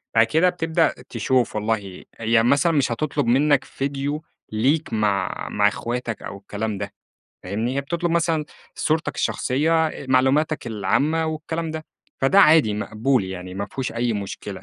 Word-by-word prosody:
بعد 115 0 +6
كده 160 +10 +3
بتبدأ 165 -2 +1 0.2
تشوف 125 0 0
والله 105 -3 -2
هي 115 0 +3
مثلًا 140 +7 +3
مش 140 -6 +1
هتطلُب 140 +4 -1
منّك 135 +3 +3
ڤيديو 140 +2 -3 0.3
ليك 130 +6 +1
مع 100 -3 0
مع 105 0 +3
أخواتك 120 +2 -3
أو - - -7
الكلام 105 +1 -4
ده 100 0 -5 0.5
فاهمني؟ 110 +7 -2
هي - - +2
بتطلب 170 +4 -2
مثلًا 165 -2 +1 0.3
صورتك 160 +1 0
الشخصيّة، 160 +5 +1
أ 140 - -8
معلوماتك 135 +3 +2
العامة 145 +9 +1
والكلام 160 +1 -3
ده، 155 0 -5 0.4
فده 165 +9 +5
عادي 155 - +6
مقبول 110 +3 0
يعني 90 -1 -7
ما 100 +1 -3
فيهوش 130 +3 -4
أي 120 0 0
مشكلة. 100 -1 -6
130 Hz, 150 wpm, -23 LUFS, 110-155 Hz, 0.5 s, بعد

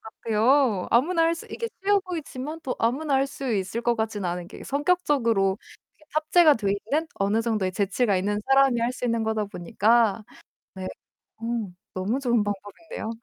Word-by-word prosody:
같아요. 225 0 +1
아무나 330 +8 +3
할 330 +1 +3
수 335 - -9
이게 460 - -4
쉬워 405 +1 +3
보이지만 320 -4 -6
또 260 -4 -2
아무나 275 +5 0
할 270 +1 +3
수 270 -3 -4
있을 200 +3 -2
것 235 0 +1
같지는 220 -3 -2
않은 175 0 -4
게 - - -11
성격적으로 275 - +1 0.4
이렇게 305 - -24
탑재가 310 0 +5
돼 215 -5 -2
있는 280 +11 -1
어느 205 +3 +1
정도의 215 -5 0
재치가 200 +2 +1
있는 205 +3 -1
사람이 270 -3 +4
할 235 +2 0
수 250 - -6
있는 230 -2 0
거다 220 -1 0
보니까. 210 +3 +2 0.5
네. 185 -1 -6 0.5
어 225 - -14 0.5
너무 200 +8 -1
좋은 240 -5 +2
방법인데요. 205 - -6
235 Hz, 355 characters per minute, -25 LUFS, 205-285 Hz, 0.5 s, 탑재가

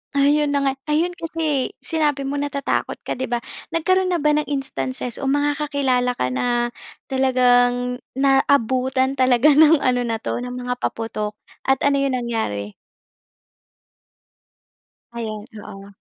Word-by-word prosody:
Ayun 285 +1 +3
na - - +3
nga. 270 - +2 0.2
Ayun 315 +4 +1
kasi, 315 -5 -2
sinabi 295 -4 0
mo 280 +1 -2
natatakot 285 -1 -2
ka - - -6
'di 260 +1 -3
ba? 240 -1 -2 0.3
Nagkaroon 370 +3 +2
na 355 -2 0
ba 300 - +4
ng 300 -1 0
instances 260 -3 -4
o 275 - -3
mga 290 +2 +1
kakilala 265 -4 0
ka 125 - -1
na 240 - 0 0.4
talagang 250 -1 +2 0.2
naabutan 265 -1 +2
talaga 255 +3 +5
ng 305 +1 +6
ano 250 -1 +2
na 225 - 0
'to 225 - -3
ng 245 0 -5
mga 250 0 -4
paputok 215 -2 -3 0.3
at 270 0 +2
ano 280 0 +3
'yung 275 -2 +1
nangyari? 105 - -3 2.4
Ayan, 215 -3 -5 0.2
oo. 195 -1 -10
265 Hz, 140 wpm, -21 LUFS, 245-285 Hz, 2.4 s, ng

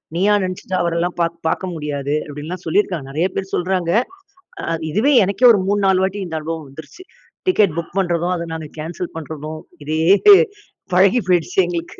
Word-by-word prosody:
நீயா 200 +4 +3
நெனச்சுட்டு 185 0 -4
அவரல்லாம் 170 +1 -1
பார்க் 170 0 0
பார்க்க 185 +2 -2
முடியாது." 145 -2 -3
அப்படீன்னுல்லாம் 155 +5 -7
சொல்லியிருக்காங்க. 170 -3 0
நெறைய 160 +6 +1
பேர் 195 0 -4
சொல்றாங்க. 180 -1 0 0.7
அ - - -3 0.2
இதுவே 220 - +2
எனக்கே 200 +6 +3
ஒரு 200 - +2
3 205 +1 +1
4 190 -1 +3
வாட்டி 195 +2 -4
இந்த 160 -2 -4
அனுபவம் 160 -1 -5
வந்துருச்சு. 160 - -12 0.4
டிக்கெட் 205 - +3
புக் 170 +2 -8
பண்றதும், 175 -1 0
அதை 170 0 -5
நாங்க 160 -2 -6
கேன்சல் 170 +3 -5
பண்றதும். 155 0 -7 0.3
இதே 155 +1 -1 0.9
பழகி 195 +7 +4
போய்டுச்சு 175 0 +1
எங்களுக்கு. 170 -1 -5
175 Hz, 160 wpm, -19 LUFS, 160-190 Hz, 0.9 s, பழகி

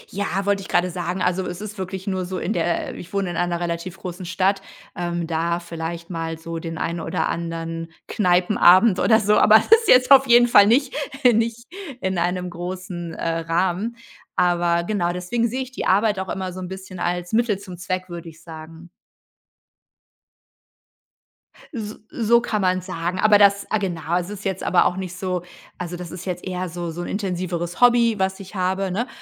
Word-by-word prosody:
Ja, 200 -1 -1
wollte 200 -1 +1
ich 190 - -9
grade 175 0 +1
sagen. 175 +2 -3
Also 185 +1 +1
es 180 +1 -6
ist 210 -1 -8
wirklich 190 0 -5
nur 190 -2 -2
so 185 0 -4
in 210 - -2
der 315 +2 -1
äh, - - -10
ich 175 - -10
wohne 195 -3 -1
in - - -6
einer 175 -1 0
relativ 170 +1 -4
großen 180 -1 -7
Stadt, 195 +2 +1 0.3
ähm, 175 -1 -2
da 170 +1 -1
vielleicht 170 0 -6
mal 165 -1 -4
so 165 0 -6
den 165 -1 -6
einen 170 +1 -2
oder 165 0 -2
anderen 165 0 -4 0.2
Kneipenabend 185 +1 +4
oder 220 -1 +4
so. 210 0 +3
Aber 215 - +6
ist 450 - +4
jetzt 255 +2 +5
auf 270 -1 +8
jeden 240 0 +6
Fall 205 -3 +7
nicht 260 +4 +3 0.4
nicht 230 +2 -1 0.3
in 190 -2 -1
einem 180 +1 -1
großen, 175 -1 -6
äh, 165 0 -2
Rahmen. 180 +7 -1 0.4
Aber 175 -1 +2
genau, 175 -3 -1
deswegen 230 +7 -1
sehe 260 +3 -3
ich 260 - -12
die - - -4
Arbeit 205 +1 +3
auch 190 - -4
immer 185 -2 -4
so 185 - -7
'n 180 - -5
bisschen 190 -1 -9
als 175 +2 -2
Mittel 225 -3 +2
zum 185 -3 -10
Zweck, 185 +1 -3
würde 170 -1 -7
ich 160 +1 -17
sagen. 160 +1 -11 2.8
S 215 -3 -6
so 235 0 +3
kann 215 -3 -2
man's 185 -1 +1
sagen. 175 0 -3
Aber 210 -1 +5
das 200 0 +5
ah, 215 - +2
genau, 175 -3 -2
es 175 +2 -6
ist 210 0 -8
jetzt 190 -1 -2
aber 180 - +3
auch 180 - +1
nicht 185 -1 -6
so, 185 -2 -2 0.4
also 175 0 -5
das 175 -2 -8
ist 180 +1 -8
jetzt 180 0 -4
eher 185 -1 -3
so 170 0 -5
so 175 +2 -6
'n - - -5
intensiveres 180 -3 -3
Hobby, 235 -2 +5
was 190 0 0
ich 190 0 -11
habe, 190 0 -1
ne? 235 +7 -1
185 Hz, 195 wpm, -22 LUFS, 175-200 Hz, 2.8 s, auf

